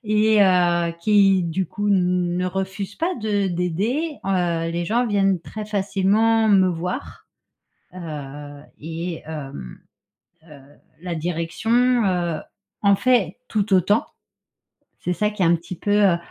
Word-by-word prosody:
et 215 0 +3
heu, 175 -3 +3
qui, 195 -1 +4
du 175 +3 -2
coup, 205 +5 -3
ne 180 -1 +1
refuse 190 +2 -4
pas 350 +3 -1
de 210 -3 0
d'aider, 200 - -1
heu, 170 -3 0
les 170 +1 -2
gens 235 +7 +1
viennent 195 -3 +2
très 215 +6 -7
facilement 210 +2 +2
me 190 -3 +5
voir. 180 +8 -5 0.7
Heu 145 -4 -8 0.2
et 165 +2 -5
hem, 135 - -8 0.7
heu, 150 -2 -13 0.4
la 180 -1 -4
direction, 220 +10 +1
heu, 175 -4 -1 0.4
en 200 -1 +5
fait 240 -7 +1
tout 210 -2 0
autant. 200 +4 +2 1.0
C'est 180 - -1
ça 210 +3 0
qui 210 -2 -4
est - - +4
un 170 +1 +4
petit 170 +2 -9
peu, 205 - -3
heu, 200 -4 +4
185 Hz, 135 wpm, -22 LUFS, 170-210 Hz, 1.0 s, me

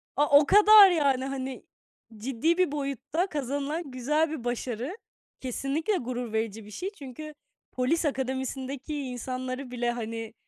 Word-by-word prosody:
A, 285 0 +6
o 295 - +2
kadar 415 +1 +8
yani! 275 -5 +2
Hani, 265 -1 -5 0.5
ciddi 270 +9 0
bir 365 -6 +2
boyutta 290 - -2
kazanılan 285 +1 -3
güzel 300 +6 +1
bir 310 -7 -5
başarı. 245 - -3 0.4
Kesinlikle 275 - -1
gurur 245 -4 -4
verici 220 -1 -2
bir 210 - -12
şey. 365 - -4
Çünkü 295 +3 -9 0.4
polis 285 +7 0
akademisindeki 265 +1 -3
insanları 255 0 -5
bile, 240 -1 -1
hani, 225 -1 -5
270 Hz, 130 wpm, -27 LUFS, 245-305 Hz, 0.5 s, kadar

